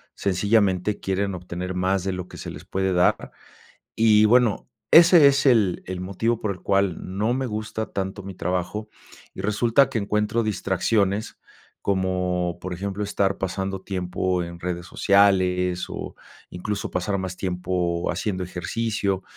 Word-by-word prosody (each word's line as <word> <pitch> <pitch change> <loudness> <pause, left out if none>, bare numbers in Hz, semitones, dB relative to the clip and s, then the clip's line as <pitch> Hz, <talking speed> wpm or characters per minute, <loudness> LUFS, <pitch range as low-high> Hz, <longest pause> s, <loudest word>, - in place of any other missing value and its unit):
sencillamente 100 0 +1
quieren 95 0 -1
obtener 90 +1 -5
más 95 0 0
de 95 - -1
lo 90 -1 -5
que - - -12
se - - -7
les - - -10
puede 95 0 -1
dar. 90 0 +2 0.7
Y 110 -1 +5
bueno, 120 0 +3 0.2
ese 170 -2 +8
es 140 0 +4
el, 110 -9 +3
el 90 0 -5
motivo 110 +5 -1
por 105 - -1
el 90 - -11
cual 100 -3 +1 0.2
no 110 +3 +1
me 130 0 -1
gusta 110 0 -4
tanto 95 0 -4
mi 95 0 -8
trabajo 90 +5 -3 0.5
y - - -7
resulta 115 +6 +3
que - - -1
encuentro 105 +2 0
distracciones. 100 0 0 0.4
Como, 90 -2 -1
por 90 0 -5
ejemplo, 100 +3 -3
estar 100 -1 0
pasando 95 +1 -3
tiempo 90 -1 -2
en 85 0 -7
redes 85 -1 -4
sociales, 90 -2 +2
o - - -7 0.3
incluso, 100 +3 -4
pasar 95 +2 -1
más 95 -1 -4
tiempo 90 -2 -1
haciendo 95 -4 -2
ejercicio. 100 +2 -2
95 Hz, 150 wpm, -24 LUFS, 90-105 Hz, 0.7 s, ese